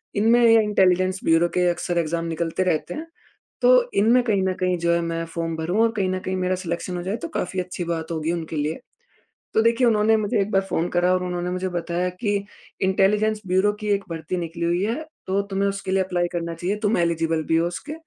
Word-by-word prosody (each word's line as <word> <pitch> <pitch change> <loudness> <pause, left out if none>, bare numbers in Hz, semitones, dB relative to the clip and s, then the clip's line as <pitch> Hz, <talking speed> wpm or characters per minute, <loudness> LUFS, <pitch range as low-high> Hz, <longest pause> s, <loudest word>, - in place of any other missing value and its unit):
इनमें 225 +4 +4
ये 225 -1 +6
intelligence 185 -2 +2
bureau 165 +1 +4
के 180 0 +3
अक्सर 175 0 -2
एग्ज़ाम 165 0 -1
निकलते 165 +2 -1
रहते 170 -4 -1
हैं। 320 +2 -6 0.5
तो 250 0 +5
इनमें 235 +5 +5
कहीं 210 -5 +1
न 190 0 +1
कहीं 180 -1 +1
जो 170 0 +1
है 170 - +2
मैं 165 0 -2
फ़ॉर्म 165 0 -4
भरूँ 175 +7 0
और 230 - +3
कहीं 190 -2 +1
न 185 0 -1
कहीं 185 0 -3
मेरा 185 0 0
सिलेक्शन 180 0 -4
हो - - -3
जाए, 190 +4 -2
तो 335 - -5
काफ़ी 190 - -3
अच्छी 180 0 -4
बात 165 -1 -3
होगी 160 0 -1
उनके 165 -2 -4
लिए। 150 +1 -2 0.8
तो 220 - +4
देखिए 230 +2 +3
उन्होंने 220 -1 +4
मुझे 215 +1 0
एक 200 +1 -1
बार 195 - +4
फ़ोन 170 +2 0
करा 175 +1 +3
और 185 - 0
उन्होंने 180 0 -3
मुझे 185 +1 -2
बताया 175 0 -2
कि 205 +3 -1 0.5
इंटेलिजेंस 205 +3 +2
ब्यूरो 190 +3 +3
की 210 - -5
एक 200 0 -3
भर्ती 165 +2 -4
निकली 170 0 -4
हुई 175 +2 +1
है। 230 +9 -2 0.2
तो 190 +1 +1
तुम्हें 195 +1 +1
उसके 195 -1 -4
लिए 195 - +3
एप्लाई 175 -2 -1
करना 170 -1 -3
चाहिए 180 +5 -2
तुम 210 -1 +2
एलिजिबल 165 -1 0
भी 160 - +1
हो 165 - +1
उसके 230 - -7
185 Hz, 225 wpm, -23 LUFS, 170-205 Hz, 0.8 s, ये